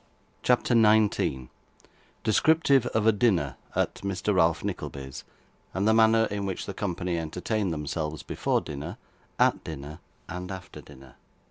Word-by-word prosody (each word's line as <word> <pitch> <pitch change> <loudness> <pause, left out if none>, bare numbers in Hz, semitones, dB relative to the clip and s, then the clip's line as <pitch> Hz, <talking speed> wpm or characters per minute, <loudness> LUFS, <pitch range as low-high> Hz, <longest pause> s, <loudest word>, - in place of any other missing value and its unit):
CHAPTER 125 0 +2
19 105 - +3 0.7
Descriptive 140 +3 +4
of 110 -2 0
a 110 - +7
Dinner 95 - +1 0.2
at - - +1
Mr. 100 +1 -1
Ralph 85 -3 +3
Nickleby's, 65 -1 -5 0.5
and 95 - 0
of - - +1
the 110 - +5
Manner 110 0 +5
in 100 -1 -2
which 95 - -4
the 100 - -5
Company 90 -3 -2
entertained 90 +5 -2
themselves, 75 0 -3
before - - 0
Dinner, 75 0 -6 0.4
at - - +3
Dinner, 75 +1 -7 0.3
and 90 +2 -6
after 95 -2 -8
Dinner. 65 -2 -16
95 Hz, 140 wpm, -27 LUFS, 75-110 Hz, 0.7 s, a